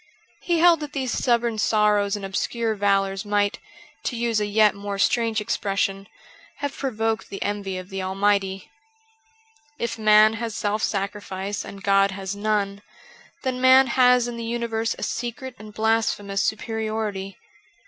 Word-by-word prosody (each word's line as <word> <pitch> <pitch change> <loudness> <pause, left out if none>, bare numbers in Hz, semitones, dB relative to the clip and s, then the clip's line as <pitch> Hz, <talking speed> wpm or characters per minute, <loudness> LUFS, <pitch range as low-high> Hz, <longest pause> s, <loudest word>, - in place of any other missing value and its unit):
He 345 -1 +1
held 335 -1 +5
that 295 -1 -7
these 260 -3 -2
stubborn 235 -3 +1
sorrows 210 -2 +2
and 200 -1 -5
obscure 225 +4 -1
valours 195 -1 +1
might 205 -1 0 0.2
— - - -25
to 250 - -1
use 230 -2 0
a 210 - 0
yet 210 0 +4
more 200 0 -5
strange 225 +2 +2
expression 195 -2 -1 0.3
— - - -25
have 285 -1 -3
provoked 225 -4 -2
the 195 - -5
envy 200 -2 -3
of 185 0 -8
the 195 -1 -4
Almighty. 195 0 0 1.1
If 235 -3 -3
man 215 0 +6
has 230 -2 -3
self 210 0 -1
sacrifice 200 -1 -3
and 195 0 -10
God 195 0 +4
has 195 0 -5
none, 205 -1 -1 0.6
then 255 -2 -2
man 260 +1 +7
has 250 -1 +5
in 240 -1 -5
the 230 - -5
universe 230 -1 -2
a - - -6
secret 245 +2 -4
and 215 0 -10
blasphemous 215 -2 0
superiority. 215 -3 -3
210 Hz, 155 wpm, -24 LUFS, 200-235 Hz, 1.1 s, man